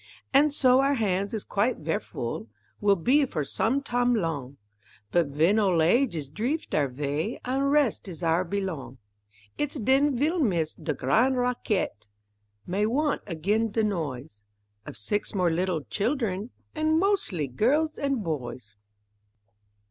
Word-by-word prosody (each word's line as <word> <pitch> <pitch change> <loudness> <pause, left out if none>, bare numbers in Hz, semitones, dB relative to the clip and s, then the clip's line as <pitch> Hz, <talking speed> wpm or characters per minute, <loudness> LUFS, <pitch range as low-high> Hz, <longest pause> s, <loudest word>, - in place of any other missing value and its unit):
An' 285 +3 +6
so 260 -3 +4
our 275 +1 +3
hands 200 -4 0
is 220 -3 -3
quite 215 +5 0
ver' 160 +1 -1
full, 115 -1 -5 0.3
Will 200 -1 +4
be, 255 - +3
for 155 - -2
som' 255 - 0
tam' 245 -1 +1
long, 145 - -3 0.5
But 175 -3 +3
ven 160 +9 +2
old 190 -5 +2
age 235 +4 +3
is 150 -4 -4
dreeft 240 - -3
our 145 -2 +2
vay 145 - -3
An' 260 +2 0
rest 280 -7 +2
is 175 -2 -7
our 165 +2 +2
belong, 185 -8 -4 0.6
It's 295 0 -1
den 270 +2 +2
ve'll 315 +7 +1
miss 175 - +1
de 155 -2 -4
gran' 225 - +2
rac_quette_, 245 - -1 0.6
May 200 +4 0
want 290 +5 0
again 205 +6 0
de 220 +1 0
noise 145 - -3 0.5
Of - - -7
six 205 - -2
more 180 -3 +2
little 175 -2 -1
children 210 - -1 0.2
An' 315 0 +1
mos'ly 350 - +1
girls 285 - +1
and 275 -5 -1
boys. 125 - -5
205 Hz, 150 wpm, -27 LUFS, 160-260 Hz, 0.6 s, An